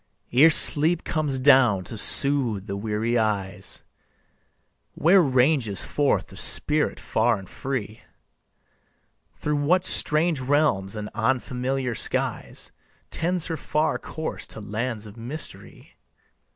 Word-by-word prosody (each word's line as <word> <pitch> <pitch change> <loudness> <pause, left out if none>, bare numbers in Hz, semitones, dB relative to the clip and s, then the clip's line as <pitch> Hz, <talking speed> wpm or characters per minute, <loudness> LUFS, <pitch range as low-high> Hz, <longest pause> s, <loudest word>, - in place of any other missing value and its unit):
Ere 145 +6 +6
sleep 160 +2 +5
comes 150 -4 -1
down 130 -8 +3
to 115 - -9
soothe 120 -4 +4
the 100 - -6
weary 110 +3 -2
eyes, 100 -3 -3 1.1
Where 185 +4 +3
ranges 130 - +1
forth 145 -2 -1
the - - -13
spirit 150 0 +3
far 115 0 -1
and 95 -1 -12
free? 115 -4 -6 1.4
Through 150 0 -3
what 175 +6 0
strange 155 0 +3
realms 130 -8 -1
and 105 0 -7
unfamiliar 125 +2 -3
skies. - - -1 0.4
Tends 175 0 0
her 165 -2 -4
far 155 +1 -2
course 160 0 -6
to - - -9
lands 110 +1 -5
of 105 +1 -14
mystery? 130 +7 -7
130 Hz, 115 wpm, -23 LUFS, 110-150 Hz, 1.4 s, Ere